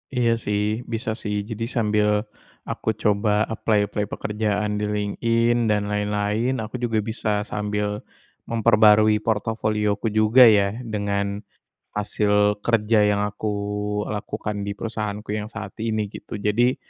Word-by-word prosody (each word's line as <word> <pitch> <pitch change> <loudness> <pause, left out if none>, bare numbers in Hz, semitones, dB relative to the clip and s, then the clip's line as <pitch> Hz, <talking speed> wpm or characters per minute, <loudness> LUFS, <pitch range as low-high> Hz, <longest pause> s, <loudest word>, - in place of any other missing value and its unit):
Iya, 120 -2 +3
sih 105 -2 -1 0.3
bisa 115 +1 -3
sih 105 -1 -2
jadi 115 0 -3
sambil 105 -2 +2 0.6
aku - - -2
coba 105 0 +2
apply-apply 105 -2 0
pekerjaan 105 -1 -2
di 105 - -1
LinkedIn 115 +3 +1
dan 105 -1 +2
lain-lain 105 +4 0
aku 115 +4 -6
juga 115 -3 0
bisa 105 -2 -1
sambil 105 0 -2 0.5
memperbarui 110 -2 +5
portofolioku 110 -1 -1
juga 110 +4 +6
ya 105 0 +3
dengan 100 -3 -2 0.5
hasil 105 0 +1
kerja 115 -1 +3
yang 100 0 +1
aku 105 +1 -6 0.6
lakukan 105 -1 -4
di 100 - -3
perusahaanku 105 -1 -4
yang 105 - -4
saat 110 -2 -8
ini, 110 -2 -1
gitu. - - -9
Jadi 115 +5 +2
105 Hz, 125 wpm, -23 LUFS, 105-110 Hz, 0.6 s, juga